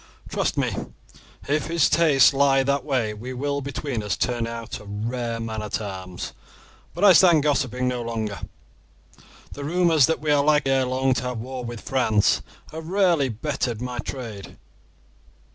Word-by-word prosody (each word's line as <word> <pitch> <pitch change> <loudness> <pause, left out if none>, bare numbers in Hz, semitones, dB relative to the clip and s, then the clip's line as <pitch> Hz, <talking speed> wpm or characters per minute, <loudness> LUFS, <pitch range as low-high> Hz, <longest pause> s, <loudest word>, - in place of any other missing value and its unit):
Trust - - -1
me, - - +1 0.8
if 150 +2 0
his 165 -2 +3
tastes 150 -5 +5
lie 135 -1 +3
that 140 0 0
way 125 -7 -1
we 120 +5 -7
will 140 +2 -2
between 140 -3 -4
us 105 -2 -2
turn 120 -2 -1
him - - -5
out 115 -1 -6
a 105 - -13
rare 115 +3 -3
man 110 -1 -4
at 105 0 -3
arms. 95 -3 -6 0.6
But 175 - -3
I 205 - +9
must 180 - +8
stand 170 -6 +5
gossiping 130 -4 0
no 125 -1 -1
longer; 110 -3 -4 1.1
the 145 - -7
rumours 165 -2 +3
that 160 - 0
we 150 -1 -1
are 145 -1 +4
likely 150 -2 +3
ere 135 -1 +2
long 130 +1 +1
to 125 - -2
have 125 -1 -3
war 125 +2 -6
with 120 -2 -6
France, 110 -6 +2 0.3
have 160 0 -7
rarely 175 -7 +2
bettered 120 -1 -3
my 125 0 -5
trade. 115 -7 -7
130 Hz, 175 wpm, -24 LUFS, 115-145 Hz, 1.1 s, I